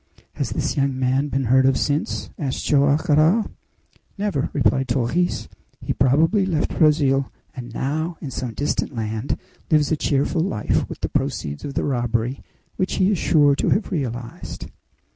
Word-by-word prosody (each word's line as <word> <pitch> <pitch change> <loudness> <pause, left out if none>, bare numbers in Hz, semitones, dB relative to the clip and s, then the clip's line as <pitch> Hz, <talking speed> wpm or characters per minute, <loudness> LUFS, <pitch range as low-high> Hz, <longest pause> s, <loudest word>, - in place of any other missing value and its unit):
"Has - - -2
this - - -2
young 135 -1 0
man 130 +2 +1
been 135 -1 -1
heard 130 +2 +4
of 135 - +3
since?" 145 +1 -1
asked 135 -4 -3
Joam 140 0 +4
Garral. 165 +7 +3 0.7
"Never," 200 -9 -1
replied 135 -1 +1
Torres. 130 +8 0 0.3
"He - - -2
probably 160 - +3
left 170 -5 -1
Brazil, 140 -4 +3 0.2
and 120 -2 -7
now, 155 +7 -2
in 140 - -6
some 120 -2 -4
distant 145 -1 -1
land, 110 +2 -2 0.3
lives 150 -1 +3
a - - +4
cheerful 145 +2 0
life 165 - 0
with - - -8
the - - -2
proceeds 70 0 -2
of 140 - -6
the - - 0
robbery 120 -1 -1 0.4
which 185 - -1
he 190 +2 +3
is 195 - 0
sure 145 -3 +4
to - - +1
have 205 - +1
realized." 125 -8 -5
140 Hz, 160 wpm, -22 LUFS, 130-155 Hz, 0.7 s, heard